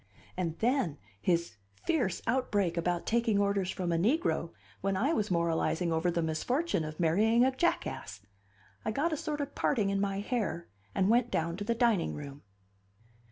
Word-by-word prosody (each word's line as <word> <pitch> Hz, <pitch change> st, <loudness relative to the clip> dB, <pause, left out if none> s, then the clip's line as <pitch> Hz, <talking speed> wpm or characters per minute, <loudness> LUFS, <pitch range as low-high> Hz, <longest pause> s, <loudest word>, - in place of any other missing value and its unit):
And 170 Hz, -3 st, -2 dB
then, 230 Hz, -, +1 dB, 0.2 s
his 170 Hz, -, 0 dB, 0.3 s
fierce 250 Hz, -, 0 dB
outbreak 215 Hz, -7 st, +1 dB
about 175 Hz, 0 st, -1 dB
taking 230 Hz, -2 st, +2 dB
orders 200 Hz, -2 st, +1 dB
from 180 Hz, -2 st, -2 dB
a 165 Hz, -, +1 dB
negro 225 Hz, -, +1 dB, 0.3 s
when 195 Hz, 0 st, 0 dB
I 270 Hz, +11 st, +2 dB
was 215 Hz, -8 st, 0 dB
moralizing 170 Hz, -1 st, +1 dB
over 160 Hz, +2 st, +1 dB
the 170 Hz, -1 st, 0 dB
misfortune 205 Hz, -, 0 dB
of 155 Hz, +1 st, -6 dB
marrying 215 Hz, +9 st, +4 dB
a 260 Hz, 0 st, +1 dB
jackass! 105 Hz, -, -1 dB, 0.6 s
I -, -, -1 dB
got 300 Hz, +9 st, 0 dB
a -, -, +2 dB
sort 300 Hz, 0 st, -3 dB
of 285 Hz, 0 st, -4 dB
parting 210 Hz, -7 st, +1 dB
in 195 Hz, 0 st, 0 dB
my 195 Hz, -1 st, -1 dB
hair, 205 Hz, -6 st, -2 dB, 0.3 s
and 190 Hz, -, +3 dB
went 240 Hz, +2 st, +3 dB
down 165 Hz, -3 st, -1 dB
to 205 Hz, -, -3 dB
the 230 Hz, +3 st, 0 dB
dining 230 Hz, -7 st, +2 dB
room. 145 Hz, -1 st, -8 dB
195 Hz, 170 wpm, -31 LUFS, 170-240 Hz, 0.6 s, marrying